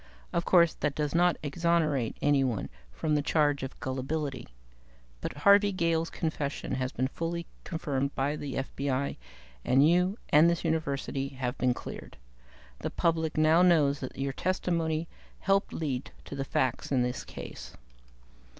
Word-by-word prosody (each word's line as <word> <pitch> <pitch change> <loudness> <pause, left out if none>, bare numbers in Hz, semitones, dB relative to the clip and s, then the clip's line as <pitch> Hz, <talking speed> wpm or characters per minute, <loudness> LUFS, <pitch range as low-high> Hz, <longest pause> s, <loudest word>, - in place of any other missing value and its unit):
"Of 170 0 0
course, 170 -3 +5
that 150 -2 -2
does 150 -2 -1
not 175 +1 +3
exonerate 155 -5 +1
anyone 135 -7 +2 0.2
from 150 - -1
the 150 - +3
charge 145 -1 +2
of 135 - -6
gullibility. 135 0 -3 0.7
But - - -3
Harvey 200 0 +7
Gale's 165 -3 0
confession 150 -4 -3
has 130 0 -1
been 130 0 -1
fully 170 +4 -3 0.2
confirmed 140 -4 -2
by 140 +3 0
the 145 -3 -5
FBI, 135 0 -2 0.5
and 135 +4 +5
you 180 +4 +3
and 155 +3 +6
this 170 -1 -1
University 140 -4 -1
have 130 -2 -4
been 125 -1 +2
cleared. - - -8 0.6
The - - -3
public 160 -2 0
knows 155 -2 +4
now 130 - -2
that - - -14
your 135 0 -2
testimony 165 -2 -1 0.3
helped 195 +1 +2
lead 135 -6 -3 0.2
to - - -7
the 135 -1 -3
facts 130 -1 -1
in 130 -3 +3
the 125 0 0
case. - - -9
150 Hz, 150 wpm, -29 LUFS, 135-165 Hz, 0.7 s, Harvey